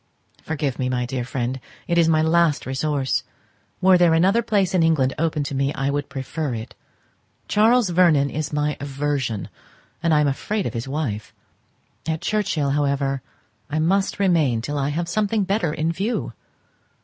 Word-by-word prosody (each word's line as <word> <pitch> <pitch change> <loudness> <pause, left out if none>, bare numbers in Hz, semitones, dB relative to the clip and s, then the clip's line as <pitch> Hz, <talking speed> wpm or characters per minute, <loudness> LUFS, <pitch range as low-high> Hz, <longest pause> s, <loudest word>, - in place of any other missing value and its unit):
Forgive 145 -4 -3
me, 125 -1 0
my 125 -1 -1
dear 125 0 -3
friend, 130 +1 -3 0.3
it 170 - +1
is 170 -1 +4
my 155 -1 +3
last 165 -2 +2
resource. 135 0 0 0.6
Were 185 -1 +6
there 170 -2 +5
another 195 +8 +3
place 200 -5 +1
in 180 - +3
England 155 -5 +2
open 160 -2 0
to 140 - -5
me 135 +1 0
I 135 +1 0
would 145 0 -2
prefer 140 0 -3
it. 110 0 -7 0.7
Charles 225 0 +4
Vernon 165 -6 +4
is 155 0 -3
my 150 0 -1
aversion; 140 -5 -2 0.5
and 170 -1 +1
I 155 - +5
am 150 - +3
afraid 200 +9 -2
of - - -3
his 115 +1 -4
wife. 135 -7 -4 0.7
At 160 0 -1
Churchhill, 175 -8 0
however, 140 -1 0 0.5
I 150 - -2
must 190 +5 +1
remain 165 - +2
till 145 +5 -3
I 140 +1 0
have 170 +3 -2
something 210 +3 0
better 190 -4 0
in 155 +2 -1
view. 200 +8 -2
150 Hz, 170 wpm, -22 LUFS, 135-175 Hz, 0.7 s, Were